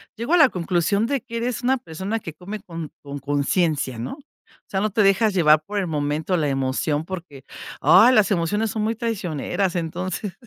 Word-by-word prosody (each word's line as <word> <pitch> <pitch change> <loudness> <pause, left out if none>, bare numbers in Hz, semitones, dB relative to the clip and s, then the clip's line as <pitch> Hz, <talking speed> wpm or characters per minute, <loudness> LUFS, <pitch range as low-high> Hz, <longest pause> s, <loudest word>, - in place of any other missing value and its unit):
llego 235 +9 -2
a 355 - +6
la 315 - +7
conclusión 180 +1 0
de 275 +2 0
que 235 0 -10
eres 235 0 -2
una 255 +2 +2
persona 200 0 -4
que 165 - -6
come 195 +6 -8
con, 165 -6 -7
con, 140 0 -7
conciencia, 145 -2 0
¿no? 120 - -4
O 280 0 -20
sea, 190 - -2
no 215 - +1
te 210 +1 +2
dejas 200 +2 +3
llevar 155 -4 +5
por 205 +4 -3
el 190 - -1
momento, 150 +3 -2
o, 180 - +3
la 150 - 0
emoción, 135 +2 -1
porque, 165 -7 -8 0.4
ah, 190 - +7
las 215 -3 +4
emociones 205 +5 0
son 215 0 -2
muy 225 +2 0
traicioneras, 195 - -2
entonces, 180 +4 -3
185 Hz, 200 wpm, -23 LUFS, 155-215 Hz, 0.4 s, la